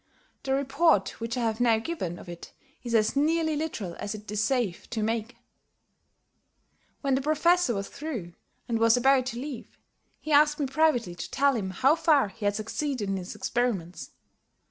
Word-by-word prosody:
The 265 0 0
report 275 - +2
which 230 +1 -3
I - - -1
have 225 -1 -1
now 235 -2 +4
given 220 - -4
of - - -12
it 175 -1 -10 0.3
is 235 -1 -2
as 215 +2 +2
nearly 315 +2 +2
literal 260 - -4
as 205 - -4
it 210 -1 -9
is 210 0 0
safe 235 -7 -1
to 220 -3 -2
make 225 +1 -1
it. - - -19 1.7
When 275 -2 +1
the 265 - +2
Professor 310 -1 +2
was 200 0 -3
through, 240 - -6 0.3
and 230 -1 -1
was 230 +1 +5
about 260 0 +3
to 235 -2 -4
leave, 270 -3 -7 0.4
he 310 - -6
asked 295 +1 +5
me 290 - +1
privately 270 - +1
to 175 - -7
tell 280 0 +2
him 200 -5 -2
how 265 - +3
far 315 -8 +3
he 205 +2 -8
had 205 0 +1
succeeded 225 +1 -3
in 195 - -1
his 180 -1 -7
experiments. 185 - -2
240 Hz, 185 wpm, -27 LUFS, 210-285 Hz, 1.7 s, was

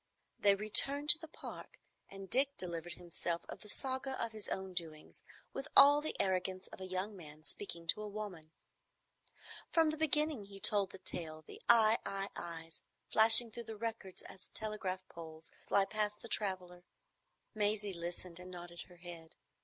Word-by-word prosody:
They 200 -1 +4
returned 275 +8 +3
to 300 - +10
the 320 - -10
Park, 310 - -11 0.3
and 195 0 -10
Dick 275 +6 0
delivered 170 -2 -6
himself 170 -1 -4
of - - -9
the 210 - -12
saga 265 +2 -1
of 230 - -3
his 215 -2 -8
own 190 -1 -5
doings, 160 -3 -6 0.3
with 270 +2 -6
all 285 +1 +9
the 310 - -6
arrogance 185 0 -1
of - - -11
a 185 - -6
young 185 +3 -4
man 155 -4 -13
speaking 170 -1 -6
to 215 - +1
a 210 - -6
woman. 200 -7 -8 1.2
From 325 -2 +3
the 310 - -6
beginning 300 -6 +1
he 195 0 -11
told 200 -1 +4
the - - -11
tale, 160 -4 -7
the - - -12
I—I—I's 195 -7 +1 0.3
flashing 225 +1 +10
through 235 +1 -8
the 220 0 -8
records 225 -4 -5
as 190 - -9
telegraph 205 -4 -4
poles 160 -1 -11 0.2
fly 195 - +2
past 210 0 -3
the - - -8
traveller. 185 -5 -2 0.7
Maisie 210 -2 -1
listened 175 0 -6
and 180 0 -11
nodded 175 -1 -9
her 180 - -18
head. 170 -2 -10
195 Hz, 165 wpm, -34 LUFS, 175-220 Hz, 1.2 s, to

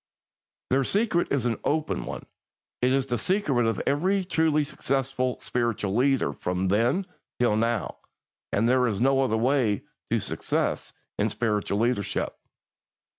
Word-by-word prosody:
Their 135 +1 +3
secret 195 - +1
is 140 -3 +1
an 115 -3 0
open 155 +1 -1
one; - - -6 0.6
it 125 +1 +3
is 135 -1 +2
the 120 -3 -2
secret 140 - +1
of 115 -3 0
every 185 +7 +1
truly 160 -3 +2
successful 135 -2 -1
spiritual 115 -5 -1
leader 135 +2 +2
from 90 +1 -2
then 120 - +2 0.3
till 120 -4 +3
now, 115 -1 0 0.5
and 110 +3 +2
there 125 0 +3
is 105 -4 -1
no 135 +2 +3
other 125 -4 +1
way 120 -4 +1 0.3
to - - +2
success - - -2 0.3
in - - +2
spiritual 105 -3 -1
leadership. 110 -3 0
125 Hz, 140 wpm, -26 LUFS, 115-140 Hz, 0.6 s, Their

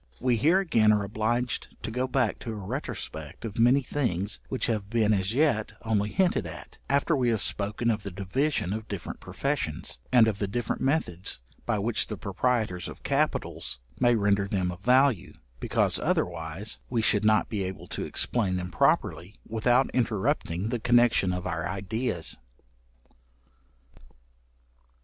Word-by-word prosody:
We 125 -1 +2
here 160 - +4
again 115 - +3
are 105 -1 +2
obliged 110 +4 -1
to - - -3
go 125 +3 -1
back 130 -4 0
to 115 - -5
a - - -5
retrospect 100 - -5
of 110 0 -5
many 125 +4 +5
things 105 -8 -1
which 130 - -1
have 105 -3 -1
been 110 -2 +3
as 100 +2 0
yet 140 -7 +2
only 105 -2 +1
hinted 180 - +1
at, 80 +2 -10
after 140 +3 +2
we 125 -3 +2
have 115 -2 +1
spoken 105 +3 +1
of 105 -1 -2
the 100 - -5
division 100 +3 -1
of 110 +1 -5
different 100 -4 -6
professions, - - -3
and 120 -3 +6
of 105 -2 -1
the 100 - 0
different 120 +5 -2
methods 100 - -1 0.3
by 115 -2 +1
which 110 +3 +1
the 105 - -5
proprietors 100 -2 -1
of - - -11
capitals - - -1 0.2
may 120 -1 +4
render 100 -2 +2
them 95 -2 -1
of 90 +1 -10
value; 125 -5 +3 0.3
because, - - +1
otherwise, 85 +4 -2
we 115 -3 0
should 105 -1 +3
not 110 0 +4
be 105 -3 -3
able 95 0 -6
to - - -3
explain 100 -7 +1
them 90 0 -4
properly, 90 +2 +1
without 120 +4 +2
interrupting 105 -5 0
the 120 - -1
connection 120 -5 +4
of 90 0 -3
our 80 -1 -2
ideas. 100 0 -2
110 Hz, 160 wpm, -27 LUFS, 95-120 Hz, 0.3 s, and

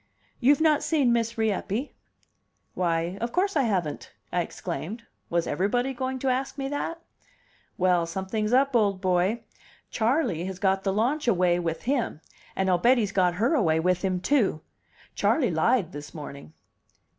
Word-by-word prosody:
"You've 280 +4 +4
not 310 -2 +4
seen 280 -7 +2
Miss 230 0 -1
Rieppe?" 220 +3 -1 0.8
"Why, 170 +1 -1
of 235 +1 -2
course 390 +1 0
I 290 - +4
haven't!" 175 -7 -2 0.2
I - - +2
exclaimed. 225 +7 -6 0.2
Was 170 0 +1
everybody 245 +8 0
going 260 +1 -3
to - - +3
ask 265 +2 -1
me 270 -1 -2
that? 310 +3 -3 0.8
"Well, 180 -2 +2
something's 190 +5 -2
up, 270 +1 +3
old 200 -4 +2
boy. 185 +5 +1 0.5
Charley 225 - 0
has 190 -1 -5
got 190 0 +1
the 195 - +1
launch 245 +9 0
away 180 -5 +3
with 165 -2 -3
him 250 - -1 0.4
and 190 - 0
I'll 180 -2 +3
bet 250 +6 +5
he's 210 -4 0
got 180 -3 +2
her 235 - +1
away 165 - +2
with 180 +2 +1
him, 185 -2 0
too. 205 - +1 0.5
Charley 255 - +2
lied 170 +3 +2
this 145 0 -9
morning." 140 - -9
205 Hz, 160 wpm, -26 LUFS, 180-255 Hz, 0.8 s, bet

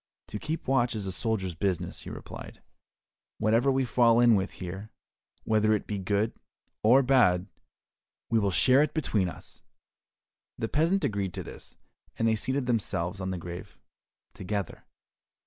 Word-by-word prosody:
"To 105 - -5
keep 160 +7 -4
watch 125 -3 +2
is 105 -2 -3
a 95 - -3
soldier's 95 -3 -1
business," 90 0 -2
he - - -8
replied, - - -9 0.7
"whatever 115 +5 +3
we 135 0 +1
fall 120 -1 +4
in 120 -1 +6
with 95 -1 0
here, 95 +4 -7 0.5
whether 110 0 +3
it 105 - -4
be 105 -2 -3
good 100 +3 0 0.5
or 125 +6 +6
bad, 120 -9 +4 0.8
we 115 - +2
will 100 -2 +1
share 130 +8 +5
it 150 +1 0
between 105 - 0
us." - - -11 1.0
The 115 - -2
peasant 165 - +1
agreed 100 -7 -2
to - - -4
this, - - -12 0.4
and 115 - +1
they 110 - +3
seated 130 +4 -1
themselves 100 -6 -1
on 95 - -2
the 95 - -3
grave 85 +1 -8 0.6
together. 100 -1 -4
110 Hz, 155 wpm, -28 LUFS, 95-125 Hz, 1.0 s, in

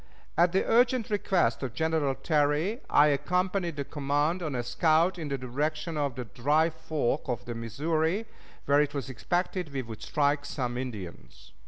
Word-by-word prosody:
At 170 +1 +4
the 190 - +1
urgent 245 -1 +3
request 185 - +1
of 125 -3 -4
General 160 -4 +1
Terry 155 - +1
I 150 +1 +6
accompanied 180 +4 0
the 140 - -2
command 145 +5 0
on 155 -5 -3
a 120 - -1
scout 160 +8 +2
in 160 - -4
the 140 -1 -2
direction 150 +6 -2
of 140 -4 -1
the 125 - -5
Dry 150 +9 +2
Fork 155 -4 -2
of 120 -3 -2
the 120 - -4
Missouri, 155 - -1 0.4
where 145 +1 +4
it 145 0 -1
was 135 -2 -3
expected 175 +5 -2
we 135 -2 -3
would 110 -2 -9
strike 145 -1 +1
some 125 -4 -3
Indians. 110 -9 -7
150 Hz, 170 wpm, -28 LUFS, 130-170 Hz, 0.4 s, I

